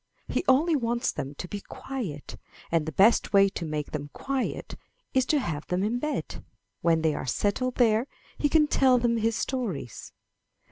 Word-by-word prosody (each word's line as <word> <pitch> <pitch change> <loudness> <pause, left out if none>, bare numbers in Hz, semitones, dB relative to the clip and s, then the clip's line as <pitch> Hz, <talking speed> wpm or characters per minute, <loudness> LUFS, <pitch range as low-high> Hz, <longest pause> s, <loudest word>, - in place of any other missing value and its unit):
He - - -1
only 310 +6 +4
wants 240 -1 0
them 140 +2 -5
to 180 - -6
be 205 +2 -5
quiet, 205 - -6 0.4
and 165 -2 +1
the - - -2
best 205 +5 +4
way 195 0 +6
to 190 - -6
make 150 -2 -3
them 145 -1 -4
quiet 270 -2 -3 0.4
is 260 -1 +2
to 305 - +3
have 155 - -4
them 180 +2 0
in 230 +4 0
bed; 300 +3 -4 0.4
when 165 -1 +2
they 160 -1 +3
are 135 - -5
settled 245 - 0
there, 230 0 +3 0.3
he 290 - +1
can 310 0 +5
tell 265 -3 +4
them 235 -1 +1
his 225 0 +1
stories. 210 - -4
225 Hz, 180 wpm, -27 LUFS, 165-260 Hz, 0.4 s, way